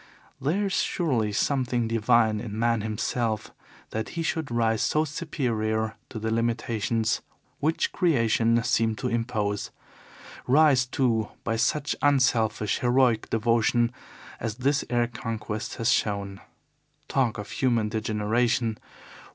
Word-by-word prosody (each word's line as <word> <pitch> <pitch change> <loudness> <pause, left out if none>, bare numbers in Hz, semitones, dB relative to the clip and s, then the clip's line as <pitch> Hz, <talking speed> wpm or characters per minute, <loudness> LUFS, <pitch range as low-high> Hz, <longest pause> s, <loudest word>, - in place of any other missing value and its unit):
There 170 +10 +1
is 195 - -2
surely 130 - 0
something 125 +1 0
divine 110 -1 +3
in 105 -1 -6
man 115 -1 +1
himself 110 +1 -2 0.4
that 110 0 -3
he 165 - -3
should 160 -2 -2
rise 115 -2 +1
so 155 +1 +2
superior 115 -9 -2
to 115 - -7
the 110 +1 -2
limitations 115 -1 0 0.4
which 155 +3 0
Creation 115 - +2
seemed 115 -3 +1
to 125 - -2
impose 110 -4 -1 0.8
rise, 135 -1 +5
too, 120 -5 0
by 115 - -1
such 145 +6 0
unselfish, 115 -7 +2
heroic 125 -2 +2
devotion 115 +1 +2 0.5
as 110 -2 -3
this 140 +4 +1
air 120 -1 +2
conquest 115 -2 -5
has 115 - +1
shown. 100 -2 -1 0.7
Talk 125 -5 +1
of 105 - -7
human 120 -5 +1
degeneration! 110 +1 0
115 Hz, 120 wpm, -26 LUFS, 110-130 Hz, 0.8 s, rise